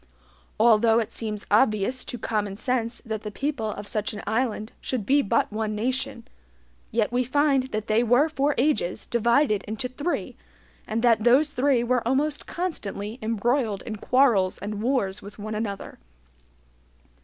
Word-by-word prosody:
Although 225 0 +5
it 230 -1 0
seems 215 -3 -4
obvious 215 +2 +2
to 245 - -6
common 210 -3 -2
sense 235 0 -2
that 220 -2 -3
the 210 - -5
people 255 0 -2
of 205 -1 -6
such 210 0 -2
an 210 - -7
island 220 -1 -1
should 245 -6 -3
be 280 +5 +4
but 205 - 0
one 215 -1 -2
nation, 250 +2 -2 0.6
yet 225 -1 0
we 250 +1 +1
find 275 +1 +2
that 215 -4 -3
they 215 +2 +2
were 245 +6 +4
for 295 -2 0
ages 255 - 0
divided 235 -1 +2
into 220 +4 -3
three, 290 +7 -3 0.5
and 225 +2 -2
that 230 -3 +4
those 270 +6 +5
three 265 -3 +2
were 245 0 +1
almost 290 +4 0
constantly 225 - -4
embroiled 225 -1 0
in 215 -2 -5
quarrels 225 -6 +3
and 210 0 -5
wars 220 -6 0
with 200 +1 -11
one 215 +1 -5
another. 210 -2 -5
230 Hz, 155 wpm, -25 LUFS, 215-260 Hz, 0.6 s, Although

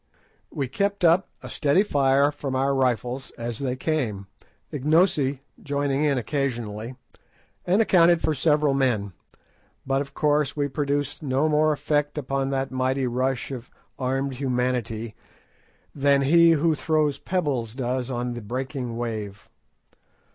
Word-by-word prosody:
We 135 - -3
kept 200 +6 0
up 170 +3 +4
a - - -7
steady 155 +6 +2
fire 140 -5 +3
from 135 -2 -4
our 135 +1 +1
rifles 130 0 -1
as 115 -1 -5
they 130 -2 -2
came, 125 -9 -2 0.5
Ignosi 145 -2 +2 0.2
joining 140 0 -1
in 145 -3 +2
occasionally, 120 -4 -3 0.7
and 195 +5 +4
accounted 175 -4 +5
for 160 - 0
several 150 0 +2
men, 115 -8 0 0.7
but 135 0 +1
of 140 0 -8
course 150 -1 +1
we 145 -1 +1
produced 145 0 -2
no 140 +1 +1
more 155 0 +3
effect 145 +1 -1
upon 135 -1 -1
that 135 0 -2
mighty 130 +1 0
rush 130 +2 -1
of 125 -2 -7 0.3
armed 135 +1 -1
humanity 125 -4 -2 0.8
than 140 -1 +3
he 165 +4 +6
who 160 +1 +2
throws 150 -2 0
pebbles 135 -11 -2
does 130 0 -2
on 125 -1 -2
the 120 - -6
breaking 125 +1 -4
wave. 110 -4 -5
135 Hz, 135 wpm, -25 LUFS, 125-150 Hz, 0.8 s, he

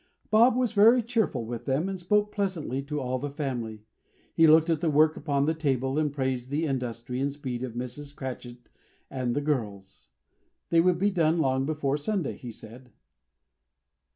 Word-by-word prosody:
Bob 230 +3 +5
was 250 -2 +1
very 230 +3 +5
cheerful 220 - -1
with 115 0 -6
them, 140 +6 0
and 195 -1 -4
spoke 210 +4 +1
pleasantly 175 - -2
to 150 +2 -4
all 130 -1 -2
the 145 +2 -4
family. 120 -7 -4 0.5
He 165 -1 +5
looked 160 +1 +6
at 165 -2 0
the 165 - +1
work 155 +1 +4
upon 140 -2 0
the 160 - +1
table, 135 -3 -1
and 150 -2 0
praised 130 -3 -2
the 150 +4 -1
industry 125 -3 -3
and 140 +1 0
speed 130 -4 -5
of 130 -3 -5
Mrs. 135 +4 -6
Cratchit 125 -2 -8 0.4
and 125 -3 -2
the 145 - 0
girls. 105 -10 -4 0.6
They 165 -1 +5
would 180 0 +3
be 200 +3 +1
done 165 -3 +2
long 135 -3 +1
before 145 -2 -1
Sunday, 180 +1 -2
he 125 - -9
said. 115 +3 -12
145 Hz, 180 wpm, -27 LUFS, 125-165 Hz, 0.6 s, looked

